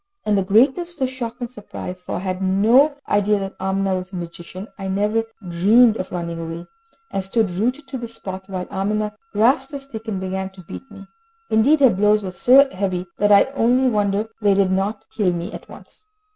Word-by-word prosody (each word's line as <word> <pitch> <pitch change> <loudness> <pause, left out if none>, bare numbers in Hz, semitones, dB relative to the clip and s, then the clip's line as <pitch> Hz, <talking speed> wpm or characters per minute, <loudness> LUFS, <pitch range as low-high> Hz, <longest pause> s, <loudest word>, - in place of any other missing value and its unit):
In 210 - +1
the 200 - +3
greatness 265 - +3
of - - -16
the - - +4
shock 240 -2 -5
and 240 - -2
surprise 205 -5 -8
for - - -5
I - - -2
had 185 0 -3
no 225 +10 +4
idea 205 0 +2
that 195 0 -5
Amina 190 0 0
was 185 +1 -7
a - - -8
magician 175 +3 -8
I 195 - -4
never 210 +4 0 0.2
dreamed 210 +7 +5
of 185 - -5
running 170 -1 -4
away, 165 +1 -6 0.5
and 195 - -2
stood 200 0 0
rooted 250 +10 -2
to 265 - -5
the 235 - -5
spot, 190 -4 -8
while 185 -2 -4
Amina 210 +2 -1 0.2
grasped 265 +6 +2
a 280 - -4
stick 240 -5 -9
and 200 -4 -2
began 190 0 -3
to 190 -1 -13
beat 270 - -10
me. 200 -2 -12 0.5
Indeed 275 +8 +4
her 265 -4 +7
blows 210 +2 +2
were 185 - -4
so 260 +10 +5
heavy, 185 -2 -2
that 205 0 +3
I 200 -1 +8
only 255 0 +3
wonder 205 -1 0
they 205 -2 +4
did 195 -1 +2
not 195 +3 -1
kill 190 -5 +1
me 175 +4 -4
at - - -10
once. - - -15
205 Hz, 210 wpm, -21 LUFS, 190-230 Hz, 0.5 s, I